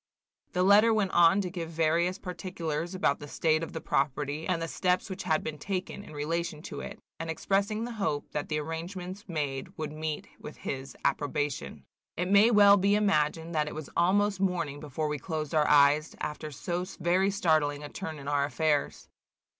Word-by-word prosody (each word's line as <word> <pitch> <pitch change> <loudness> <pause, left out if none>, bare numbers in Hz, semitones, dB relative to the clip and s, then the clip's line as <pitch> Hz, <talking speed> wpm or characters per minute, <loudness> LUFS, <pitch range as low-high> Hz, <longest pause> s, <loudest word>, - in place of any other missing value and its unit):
The 180 - +2
letter 205 +4 +6
went 210 -3 +1
on 175 +3 +5
to 180 -2 -4
give 170 -3 -5
various 165 +2 +1
particulars 175 -2 -4
about 165 -6 +1
the 145 - -8
state 155 +2 +1
of 165 - -5
the 160 - -5
property, 145 +2 -1
and 180 -2 +1
the 165 - -3
steps 180 +3 0
which 190 - -5
had 155 -1 +1
been 155 -1 -5
taken 190 +3 -4
in 155 - -12
relation 155 +1 -3
to - - -6
it, - - -7 0.2
and 165 - -4
expressing 200 +6 0
the 240 - -4
hope 195 -10 -2
that 150 - -3
the 150 - 0
arrangements 175 +5 -6
made 145 -5 -3
would 155 -1 -4
meet 155 0 -4
with 150 - -9
his 135 0 -6
approbation. 145 - -1 0.3
It 180 +2 -1
may 205 +3 +7
well 205 -2 +7
be 200 +1 +3
imagined 165 -5 +1
that 150 -1 +1
it - - -6
was 155 -3 -7
almost 200 +2 +2
morning 175 -7 -1
before 150 +1 -3
we 150 -1 -2
closed 155 0 -4
our 150 -1 +3
eyes, 145 +2 +4
after 150 +1 -4
so 175 +5 -3 0.2
very 180 +3 +2
startling 155 -7 +1
a 145 - -7
turn 160 -3 -6
in 140 -1 -9
our 145 -1 +2
affairs. 150 0 0
165 Hz, 190 wpm, -29 LUFS, 150-185 Hz, 0.3 s, may